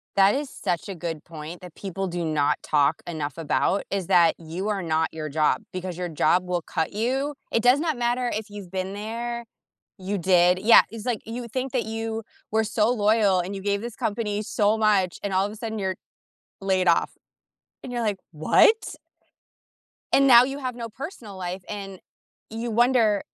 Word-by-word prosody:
That 195 Hz, +3 st, +5 dB
is 285 Hz, -1 st, -3 dB
such 175 Hz, +2 st, -3 dB
a 190 Hz, -, -4 dB
good 165 Hz, -2 st, -5 dB
point 160 Hz, +2 st, -9 dB
that 180 Hz, -3 st, -11 dB
people 195 Hz, 0 st, -4 dB
do 175 Hz, -1 st, -3 dB
not 155 Hz, -3 st, +1 dB
talk 150 Hz, +1 st, +2 dB
enough 150 Hz, -3 st, -4 dB
about, 165 Hz, +4 st, +1 dB
is 195 Hz, -3 st, -2 dB
that 175 Hz, -3 st, +5 dB
you 175 Hz, +5 st, -5 dB
are 195 Hz, -3 st, -1 dB
not 160 Hz, 0 st, 0 dB
your 155 Hz, -1 st, -5 dB
job 150 Hz, -3 st, +1 dB
because 185 Hz, -1 st, -5 dB
your 180 Hz, -1 st, -2 dB
job 165 Hz, +4 st, +2 dB
will 180 Hz, -1 st, -1 dB
cut 160 Hz, +3 st, -3 dB
you. 265 Hz, +7 st, -1 dB, 0.2 s
It 230 Hz, -, +1 dB
does 250 Hz, +3 st, +5 dB
not 315 Hz, -5 st, -1 dB
matter 240 Hz, 0 st, 0 dB
if 215 Hz, 0 st, -4 dB
you've 205 Hz, -3 st, -9 dB
been 190 Hz, +1 st, -3 dB
there 235 Hz, +3 st, -4 dB, 0.5 s
You 195 Hz, +2 st, -2 dB
did? 180 Hz, 0 st, +4 dB
Yeah, 225 Hz, +4 st, +8 dB
it's, 225 Hz, 0 st, -8 dB
like, 240 Hz, -4 st, -1 dB
you 235 Hz, +1 st, -5 dB
think 255 Hz, +3 st, -3 dB
that 250 Hz, -, 0 dB
you 225 Hz, 0 st, -4 dB, 0.3 s
were 220 Hz, 0 st, +2 dB
so 215 Hz, +1 st, +1 dB
loyal 210 Hz, -4 st, +3 dB
and 190 Hz, +3 st, -3 dB
you 195 Hz, -, -6 dB
gave 200 Hz, +1 st, 0 dB
this 235 Hz, -1 st, -6 dB
company 210 Hz, -1 st, -2 dB
so 210 Hz, +1 st, +1 dB
much 200 Hz, -5 st, +2 dB
and 200 Hz, -1 st, -2 dB
all 190 Hz, +1 st, +3 dB
of 205 Hz, -, -4 dB
a -, -, -9 dB
sudden 220 Hz, -1 st, -5 dB
you're 190 Hz, -1 st, -1 dB, 0.7 s
laid 190 Hz, -2 st, +1 dB
off. 170 Hz, -, +3 dB, 0.7 s
And 245 Hz, -, -6 dB
you're 240 Hz, -1 st, -2 dB
like, 205 Hz, -3 st, -1 dB
"What?" 160 Hz, -, +3 dB, 1.2 s
And 275 Hz, 0 st, +5 dB
now 240 Hz, -1 st, +9 dB
you 270 Hz, +2 st, -3 dB
have 255 Hz, -2 st, -4 dB
no 230 Hz, -1 st, -6 dB
personal 230 Hz, -, -8 dB
life 180 Hz, 0 st, -5 dB
and 195 Hz, -2 st, -6 dB, 0.5 s
you 230 Hz, +1 st, -4 dB
wonder 230 Hz, -3 st, +3 dB
200 Hz, 195 wpm, -25 LUFS, 180-230 Hz, 1.2 s, now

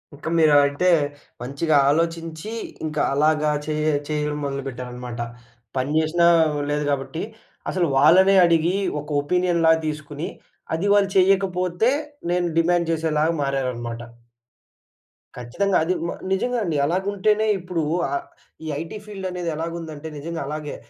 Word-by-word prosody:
ఇంకా 155 Hz, +3 st, -6 dB
మీరు 155 Hz, -2 st, +5 dB
అలాయితే, 145 Hz, +5 st, +3 dB, 0.5 s
మంచిగా 140 Hz, +5 st, +1 dB
ఆలోచించి, 165 Hz, +3 st, -1 dB, 0.4 s
ఇంకా 155 Hz, -1 st, -1 dB
అలాగా 150 Hz, +1 st, +2 dB
చే 155 Hz, -, -2 dB, 0.3 s
చేయడం 150 Hz, -1 st, -2 dB
మొదలుపెట్టారన్నమాట. 125 Hz, -3 st, -5 dB, 0.6 s
పని 130 Hz, +3 st, -1 dB
చేసినా 170 Hz, +2 st, +3 dB, 0.4 s
లేదు 150 Hz, 0 st, 0 dB
కాబట్టి, 140 Hz, +4 st, -3 dB, 0.5 s
అసలు 175 Hz, -3 st, +1 dB
వాళ్ళనే 185 Hz, +7 st, +6 dB
అడిగి, 170 Hz, +1 st, +2 dB, 0.3 s
ఒక 150 Hz, -, -12 dB
ఒపీనియన్‌లాగా 170 Hz, 0 st, +2 dB
తీసుకొని, 150 Hz, 0 st, -5 dB, 0.5 s
అది 180 Hz, +5 st, -1 dB
వాళ్ళు 200 Hz, -1 st, +3 dB
చేయకపోతే, 185 Hz, +2 st, +2 dB, 0.4 s
నేను 175 Hz, 0 st, +1 dB
డిమాండ్ 170 Hz, 0 st, +2 dB
చేసేలాగా 160 Hz, 0 st, +1 dB
మారారన్నమాట. 125 Hz, -4 st, -3 dB, 1.4 s
ఖచ్చితంగా 160 Hz, +12 st, 0 dB
అది. 180 Hz, +3 st, +1 dB
మ -, -, -3 dB, 0.2 s
నిజంగా 245 Hz, +5 st, 0 dB
అండి. 165 Hz, -6 st, -1 dB
అలాగుంటేనే, 200 Hz, +5 st, +1 dB
ఇప్పుడు 175 Hz, -2 st, -3 dB, 0.3 s
ఆహ్, 350 Hz, 0 st, -3 dB, 0.4 s
ఈ -, -, -5 dB
ఐటీ 165 Hz, +5 st, -7 dB
ఫీల్డ్ 195 Hz, -3 st, -6 dB
అనేది 175 Hz, -2 st, -3 dB
ఎలాగుందంటే, 160 Hz, -1 st, -5 dB
నిజంగా 165 Hz, +3 st, -5 dB
అలాగే 150 Hz, 0 st, -5 dB
160 Hz, 120 wpm, -23 LUFS, 145-180 Hz, 1.4 s, వాళ్ళనే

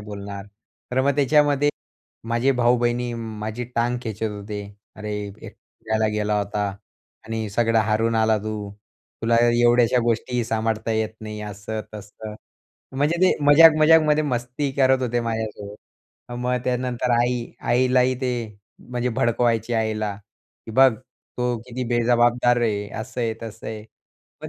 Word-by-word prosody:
बोलणार? 100 Hz, -1 st, -8 dB, 0.4 s
तर 130 Hz, -, +1 dB
मग 140 Hz, +1 st, +2 dB
त्याच्यामध्ये 145 Hz, 0 st, +3 dB, 0.6 s
माझे 120 Hz, +4 st, +2 dB
भाऊ-बहीणी 120 Hz, 0 st, +2 dB
माझी 110 Hz, +1 st, -5 dB
टांग 120 Hz, +1 st, +1 dB
खेचत 110 Hz, -1 st, -3 dB
होते. 105 Hz, 0 st, -6 dB, 0.3 s
अरे, 105 Hz, 0 st, -5 dB
एकटा 100 Hz, +2 st, -10 dB, 0.4 s
फिरायला 110 Hz, 0 st, +1 dB
गेला 105 Hz, 0 st, 0 dB
होता 105 Hz, 0 st, -2 dB, 0.6 s
आणि 110 Hz, -1 st, -3 dB
सगळं 115 Hz, +1 st, +2 dB
हारून 110 Hz, +1 st, +1 dB
आला 110 Hz, 0 st, +3 dB
तू. 105 Hz, -1 st, -5 dB, 0.5 s
तुला 115 Hz, +1 st, +3 dB, 0.2 s
एवढ्याशा 120 Hz, 0 st, +4 dB
गोष्टीही 120 Hz, +1 st, 0 dB
सांभाळता 110 Hz, 0 st, -1 dB
येत 110 Hz, 0 st, 0 dB
नाही, 105 Hz, -1 st, -7 dB
असं, 105 Hz, +1 st, -5 dB
तसं. 105 Hz, +1 st, -9 dB, 0.6 s
म्हणजे 150 Hz, +5 st, +1 dB
ते 185 Hz, -, +6 dB
मजाक 160 Hz, +2 st, +8 dB
मजाकमध्ये 155 Hz, -1 st, +5 dB
मस्ती 130 Hz, +1 st, -2 dB
करत 130 Hz, -1 st, +3 dB
होते 120 Hz, -1 st, 0 dB
माझ्यासोबत. 110 Hz, -3 st, -4 dB, 0.6 s
मग 125 Hz, +1 st, -1 dB
त्यानंतर 125 Hz, 0 st, -1 dB
आई, 120 Hz, -1 st, 0 dB, 0.2 s
आईलाही 125 Hz, +1 st, +2 dB
ते 125 Hz, -1 st, 0 dB, 0.6 s
म्हणजे 125 Hz, 0 st, -2 dB
भडकवायचे 120 Hz, -1 st, 0 dB
आईला, 110 Hz, -2 st, -1 dB, 0.5 s
की -, -, -7 dB
बघ 130 Hz, +1 st, +6 dB, 0.5 s
तो 125 Hz, -1 st, 0 dB
किती 125 Hz, +1 st, -4 dB
बेजबाबदार 120 Hz, 0 st, +3 dB
आहे. 105 Hz, -3 st, -1 dB
असं 125 Hz, +2 st, -6 dB
आहे, 115 Hz, -1 st, -1 dB
तसं 115 Hz, 0 st, -8 dB
आहे. 110 Hz, -1 st, -6 dB, 0.6 s
मग -, -, -5 dB
115 Hz, 135 wpm, -23 LUFS, 110-125 Hz, 0.6 s, मजाक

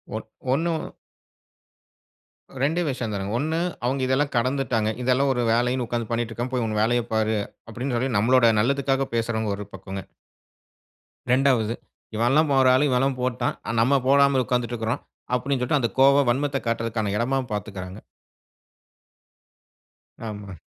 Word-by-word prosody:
One -, -, -5 dB, 0.3 s
ஒண்ணு, 165 Hz, +4 st, +1 dB, 1.9 s
2 160 Hz, +6 st, +1 dB
விஷயம் 125 Hz, -5 st, -3 dB
தானுங்க. 100 Hz, +1 st, -3 dB
1, 160 Hz, +4 st, -1 dB, 0.3 s
அவுங்க 130 Hz, +2 st, 0 dB
இதெல்லாம் 140 Hz, +2 st, +1 dB
கடந்துட்டாங்க, 125 Hz, -3 st, 0 dB
"இதெல்லாம் 130 Hz, +2 st, +2 dB
ஒரு 125 Hz, -, -1 dB
வேலைன்னு 125 Hz, +2 st, +1 dB
உக்காந்து 120 Hz, -2 st, -3 dB
பண்ணிட்ருக்காம, 120 Hz, +1 st, -2 dB
போய் 120 Hz, -3 st, 0 dB
உங்க 110 Hz, -1 st, -2 dB
வேலையப் 120 Hz, +1 st, +1 dB
பாரு” 110 Hz, 0 st, +1 dB, 0.3 s
அப்டின்னு 125 Hz, +3 st, -3 dB
சொல்லி 130 Hz, +3 st, 0 dB
நம்மலோட 120 Hz, +2 st, +4 dB
நல்லதுக்காக 135 Hz, +2 st, +1 dB
பேசுறவங்க 110 Hz, -2 st, -1 dB
ஒரு 105 Hz, -, -6 dB
பக்கங்க. 95 Hz, 0 st, -7 dB, 1.3 s
2ஆவது, 125 Hz, -4 st, +3 dB, 0.4 s
"இவன்லாம் 135 Hz, +7 st, +3 dB
ஒரு 130 Hz, -, +5 dB
ஆளு, 145 Hz, +3 st, +3 dB
இவன்லாம் 130 Hz, +1 st, +1 dB
போட்டான். 125 Hz, -1 st, -1 dB
ஆனா, 115 Hz, -, -2 dB
நம்ம 135 Hz, +3 st, +3 dB
போடாமல் 140 Hz, -1 st, +4 dB
உக்கார்ந்துட்ருக்றோம்." 120 Hz, -1 st, -1 dB, 0.3 s
அப்படீன்னு 130 Hz, +2 st, -1 dB
சொல்லிட்டு 135 Hz, +4 st, +1 dB
அந்த 115 Hz, -, +1 dB
கோவம் 140 Hz, 0 st, +5 dB
வன்மத்த 140 Hz, +2 st, 0 dB
காட்றதுக்கான 115 Hz, -3 st, -1 dB
எடமாவும் 130 Hz, +1 st, -1 dB
பார்த்துக்குறாங்க. 95 Hz, -2 st, -5 dB, 2.3 s
ஆமா. 100 Hz, -2 st, -8 dB
125 Hz, 130 wpm, -24 LUFS, 115-135 Hz, 2.3 s, ஒரு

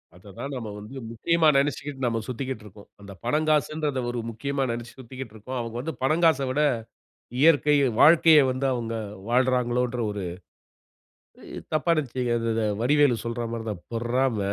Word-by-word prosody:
அதை 95 Hz, +3 st, -15 dB
தான் 140 Hz, 0 st, -5 dB
நம்ம 115 Hz, -3 st, -6 dB
வந்து 125 Hz, +6 st, -9 dB
முக்கியமா 165 Hz, +7 st, +2 dB
நெனைச்சுக்கிட்டு 140 Hz, -1 st, -1 dB
நம்ம 115 Hz, -1 st, 0 dB
சுத்திகிட்டு 130 Hz, -2 st, -4 dB
இருக்கோம். 100 Hz, 0 st, -14 dB
அந்த 100 Hz, -1 st, -10 dB
பனங்காசுன்றத 150 Hz, -1 st, +1 dB
ஒரு 120 Hz, -1 st, -3 dB
முக்கியமா 140 Hz, +4 st, -2 dB
நெனைச்சு 120 Hz, 0 st, -6 dB
சுத்திக்கிட்டு 130 Hz, -2 st, -9 dB
இருக்கோம். 125 Hz, +5 st, -6 dB
அவங்க 115 Hz, 0 st, -6 dB
வந்து 160 Hz, +5 st, -4 dB
பனங்காசை 155 Hz, -1 st, +3 dB
விட 150 Hz, +3 st, +1 dB, 0.8 s
இயற்கை, 150 Hz, -2 st, +5 dB, 0.2 s
வாழ்க்கையை 160 Hz, -1 st, +7 dB
வந்து 130 Hz, +2 st, -1 dB
அவங்க 115 Hz, -2 st, -3 dB, 0.4 s
வாழ்றாங்களோன்ற 125 Hz, -1 st, +1 dB
ஒரு 100 Hz, -2 st, -4 dB, 1.5 s
தப்பா 155 Hz, +2 st, +1 dB
நினைச்சுக்காதீங்க. 125 Hz, -4 st, -1 dB
அத 115 Hz, 0 st, 0 dB
அத 115 Hz, -, 0 dB, 0.2 s
வடிவேலு 140 Hz, -4 st, +3 dB
சொல்ற 115 Hz, 0 st, -3 dB
மாதிரிதான், 110 Hz, -6 st, -5 dB
"பொறாம," 120 Hz, 0 st, 0 dB
125 Hz, 140 wpm, -25 LUFS, 115-145 Hz, 1.5 s, வாழ்க்கையை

